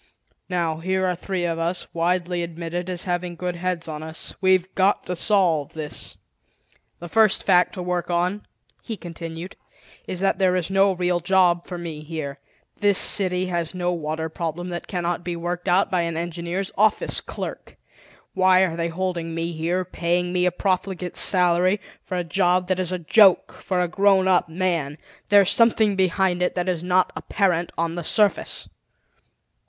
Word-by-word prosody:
Now, 170 -3 -1
here 190 +2 0
are 180 -1 0
three 180 0 -3
of 165 -1 -2
us, 170 +2 -2
widely 175 +1 0
admitted 170 +1 -5
as 180 -1 -4
having 175 -1 -2
good 180 +1 -4
heads 180 -1 -2
on 155 -1 -6
us. 160 0 -6
We've 185 -1 +2
got 195 +1 +2
to 180 - -3
solve 170 -7 +1
this." 155 -2 -6 0.8
"The 175 - -8
first 215 +2 +3
fact 180 0 +3
to 180 - -5
work 180 -1 -2
on," 180 +4 0 0.4
he 225 -3 -6
continued, 170 0 -8 0.5
"is 180 - -4
that 195 0 +1
there 185 -1 +3
is 180 0 -2
no 195 +1 +4
real 180 -1 0
job 175 -1 +2
for 180 - -5
me 165 -3 -6
here. 155 -3 -6 0.4
This 205 -2 +3
city 185 -2 +3
has 175 -1 -3
no 180 0 -1
water 160 -1 -3
problem 170 +2 -4
that 175 -1 -5
cannot 175 -2 -2
be 175 -1 -3
worked 175 +2 -4
out 180 +2 +3
by 180 -2 +2
an 170 -1 -2
engineer's 175 +3 -3
office 215 0 +2
clerk. - - -7 0.6
Why 185 0 +4
are 165 -3 -3
they 165 0 -1
holding 170 -1 -3
me 165 +1 -2
here, 170 +3 -1
paying 175 0 -1
me 180 0 +2
a - - +2
profligate 185 -1 -2
salary, 180 +1 +4 0.2
for 185 - -4
a 180 - -1
job 180 +1 +1
that 185 -1 +1
is 185 -1 -2
a 185 - -1
joke 190 +3 +4
for 185 -2 -3
a 180 - +1
grown 195 +1 +3
up 180 -2 +3
man? 165 -4 -1 0.3
There's 200 -2 +6
something 220 -3 +3
behind 185 -1 +1
it 180 - 0
that 180 0 -1
is 180 -3 -1
not 180 +1 +1
apparent 175 -4 0
on 165 0 -1
the 175 0 -5
surface." 205 +4 +1
180 Hz, 175 wpm, -23 LUFS, 170-185 Hz, 0.8 s, There's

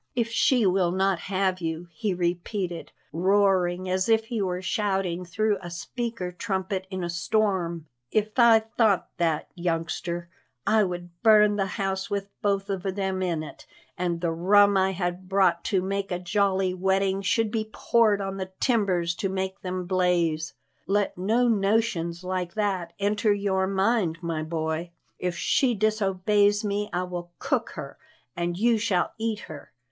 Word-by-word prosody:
If 235 -2 0
she 235 0 +3
will 185 -1 +3
not 190 -1 +1
have 185 -1 -1
you," 165 +1 -3
he 185 +4 -2
repeated, 175 +1 -2 0.2
roaring 185 0 +2
as 185 +3 0
if 225 0 +3
he 225 -1 -3
were 180 -2 -1
shouting 190 -3 -1
through 205 +4 0
a 175 - -7
speaking 190 +1 -4
trumpet 190 -2 -2
in 185 -2 -4
a - - -1
storm, 175 -3 0 0.2
"if 215 +5 +1
I 230 -2 +7
thought 220 -3 +1
that, 165 -3 0
youngster, 170 0 -3 0.4
I 220 -1 +4
would 175 -1 -5
burn 210 -1 +6
the 195 -1 0
house 195 -1 -2
with 200 0 -3
both 200 -1 0
of 190 -2 -2
them 190 0 -2
in 170 -4 -1
it, 155 - -11 0.3
and 175 -2 -2
the 170 -2 0
rum 200 +4 +4
I 190 0 +2
had 180 0 -3
bought 190 -3 +3
to 190 -4 +1
make 195 +1 -2
a 180 - 0
jolly 190 0 +1
wedding 190 +1 +1
should 215 +3 +1
be 215 -1 -2
poured 215 -4 +2
on 195 0 -4
the 190 -1 -4
timbers 190 -9 +1
to 195 - -1
make 190 0 -3
them 185 -1 -3
blaze. 175 -4 +1 0.3
Let 205 +1 +1
no 225 +7 +2
notions 195 -5 +1
like 180 -1 -3
that 190 -5 -1
enter 205 +1 +1
your 195 -2 +1
mind, 195 -3 +1
my 165 -2 -2
boy. 160 +1 -3 0.3
If 180 -1 -2
she 250 +5 +2
disobeys 205 0 +2
me, 205 0 -1
I 180 - -1
will 175 -1 -6
cook 270 -4 -1
her 145 -4 -8 0.4
and 175 0 -2
you 230 +2 +3
shall 195 -5 +1
eat 220 -1 -2
her. 155 -4 -10
190 Hz, 160 wpm, -26 LUFS, 175-205 Hz, 0.4 s, I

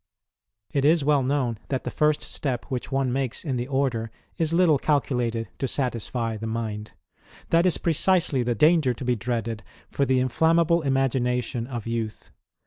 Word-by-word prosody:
It 140 - 0
is 155 0 +4
well 145 -1 +4
known 130 -4 0
that 130 -2 -2
the - - -4
first 150 -1 +1
step 130 -5 -3
which 130 0 -4
one 135 -2 0
makes 130 +1 -2
in 135 -4 -1
the 120 0 -2
order 130 -5 0 0.3
is 165 -2 -1
little 165 -4 +4
calculated 125 -6 0
to 135 - 0
satisfy 120 -3 -2
the 110 +1 -5
mind. 110 -2 -4 0.6
That 170 +2 +4
is 180 - +2
precisely 170 -3 +2
the 120 0 0
danger 150 -2 +4
to 125 - -7
be 125 0 +2
dreaded 115 -1 -3 0.3
for 140 - 0
the 130 0 +3
inflammable 165 +6 +3
imagination 125 -4 0
of 120 -5 -5
youth. 115 -2 -4
130 Hz, 165 wpm, -25 LUFS, 120-150 Hz, 0.6 s, is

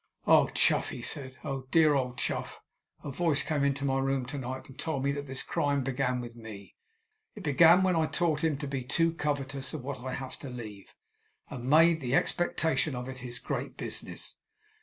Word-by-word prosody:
"Oh, - - +6
Chuff," - - +2
he - - -7
said, 130 -2 -4
"oh, 135 -3 -4
dear 155 -1 +5
old 125 -3 -1
Chuff! - - -3 0.4
a 145 - -5
voice 155 0 +1
came 150 -3 0
into 140 0 +1
my 135 -1 +1
room 135 -1 0
to 140 +3 -5
night, 130 +1 -5
and 135 - -13
told 140 -4 -2
me 140 - +2
that 145 0 -4
this 135 -1 -2
crime 145 -4 0
began 125 -1 0
with 120 -1 -7
me. 105 -5 -10 0.6
It - - -9
began 165 +5 +6
when 185 -2 +3
I 160 -1 +2
taught 155 -1 0
him 155 -3 +2
to 145 0 -5
be 135 -1 -2
too 165 +6 +1
covetous 140 -3 -2
of - - -6
what 135 -1 -5
I 130 +1 -5
have 130 -1 -7
to 140 - -7
leave, 110 -5 -9 0.6
and 125 -1 -5
made 165 +2 +6
the 130 -1 0
expectation 160 -4 +1
of 125 +1 -5
it 130 0 -7
his 125 -1 -5
great 115 - -4
business!" - - -4
135 Hz, 200 wpm, -30 LUFS, 130-150 Hz, 0.6 s, Oh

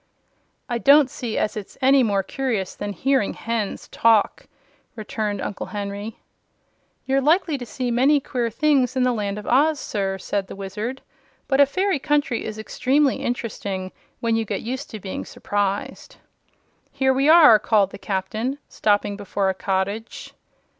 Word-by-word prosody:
"I 240 -3 -2
don't 280 0 +6
see 230 -3 -4
as 210 - 0
it's 210 -3 -8
any 270 +1 +5
more 200 -5 +1
curious 225 -6 -2
than 205 0 -5
hearing 260 +3 0
hens 225 -3 -3
talk," 225 -3 +2 0.5
returned 215 -2 -3
Uncle 200 - -5
Henry. 205 +1 -5 0.9
"You're 270 +1 +1
likely 320 +2 +2
to 245 - -7
see 250 +1 -3
many 270 +5 +4
queer 245 -3 -2
things 270 0 +1
in 260 - +2
the 250 -1 +2
Land 205 -2 -3
of 210 - -7
Oz, 290 +4 +3
sir," 195 -5 -2
said 195 +1 -3
the - - -9
Wizard. 210 +7 -5 0.4
"But 270 0 +3
a 280 - +6
fairy 375 +2 0
country 290 -4 0
is 215 0 -6
extremely 265 +5 +1
interesting 200 -6 -4 0.3
when 230 -1 +1
you 225 - +1
get 220 - -4
used 260 +6 -5
to 220 - -7
being 190 -1 -5
surprised." 205 -1 -3 0.8
"Here 265 0 +2
we 275 +3 +2
are!" 310 -10 +8
called 205 -3 +2
the - - -10
Captain, 215 +8 -3
stopping 205 -1 0
before 200 -1 -1
a - - 0
cottage. 195 +4 -3
230 Hz, 160 wpm, -22 LUFS, 205-270 Hz, 0.9 s, are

